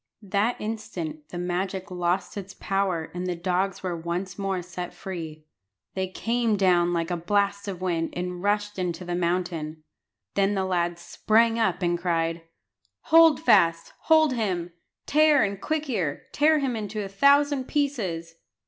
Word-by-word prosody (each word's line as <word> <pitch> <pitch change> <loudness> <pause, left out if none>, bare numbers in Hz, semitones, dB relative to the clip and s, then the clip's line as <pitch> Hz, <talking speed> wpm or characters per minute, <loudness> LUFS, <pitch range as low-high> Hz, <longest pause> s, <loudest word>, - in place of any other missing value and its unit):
That 205 +4 0
instant 175 -9 -5
the 175 - -7
magic 185 +2 -3
lost 180 +1 -1
its 195 -1 -7
power, 190 -5 -1
and 180 +1 -4
the 180 - -1
dogs 180 +3 -1
were 180 -2 -2
once 175 +3 -4
more 195 -2 -1
set 180 0 -7
free. 160 -5 -7 0.5
They 190 0 -2
came 230 +3 0
down 175 -3 +3
like 170 0 -1
a - - +1
blast 200 +3 0
of 185 -3 -5
wind, 170 -3 -1
and 180 0 -4
rushed 205 0 0
into 180 0 -3
the 175 - -3
mountain. 170 -3 -2 0.5
Then 200 +1 +2
the 190 -1 0
lad 175 -2 0
sprang 225 +6 +2
up 190 -5 +1
and 175 0 +1
cried 165 -1 0 0.7
"Hold 325 -1 +7
fast, 165 - +3
hold 315 -3 +5
him; 180 -7 -2 0.3
Tear 305 -1 +5
and 200 -1 -2
Quick 310 -1 -2
ear, 180 - -2
tear 310 +2 +4
him 270 -4 -1
into 210 -1 -4
a - - -4
thousand 280 +6 +3
pieces." 200 - -2
185 Hz, 155 wpm, -26 LUFS, 175-210 Hz, 0.7 s, Hold